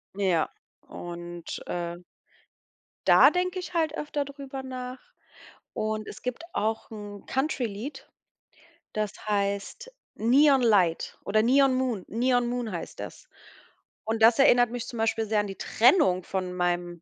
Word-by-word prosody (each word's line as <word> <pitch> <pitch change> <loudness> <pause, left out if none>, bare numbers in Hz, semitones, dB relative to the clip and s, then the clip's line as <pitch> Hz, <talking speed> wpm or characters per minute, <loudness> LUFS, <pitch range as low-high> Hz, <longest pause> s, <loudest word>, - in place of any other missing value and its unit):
Ja, 185 -5 +1 0.4
und, 175 -1 -7
äh 175 0 -3 1.1
Da - - +8
denke 365 +1 -1
ich 360 - -7
halt 320 -2 0
öfter 295 -1 -2
drüber 275 -1 -8
nach. 255 0 -6 0.7
Und 215 0 -2
es - - -9
gibt 250 +6 -4
auch 220 +1 -2
'n 205 -2 -9
Country-Lied, 265 -2 -3 0.9
das 215 -1 -1 0.2
heißt 200 - -2 0.2
Neon 270 +4 +5
Light 190 -8 +2
oder 215 +2 +2
Neon 265 +1 +4
Moon. 245 -8 -1
Neon 245 +1 +1
Moon 240 -3 -3
heißt 170 - -6
das. - - -9 0.8
Und 220 0 0
das 230 +3 +6
erinnert 245 -3 +5
mich 245 0 -5
zum 240 - -7
Beispiel 225 0 +1
sehr 215 0 +1
an 205 - -4
die 195 - -7
Trennung 230 - +3
von 185 -1 -3
meinem 175 -1 -1
225 Hz, 140 wpm, -27 LUFS, 200-260 Hz, 1.1 s, Da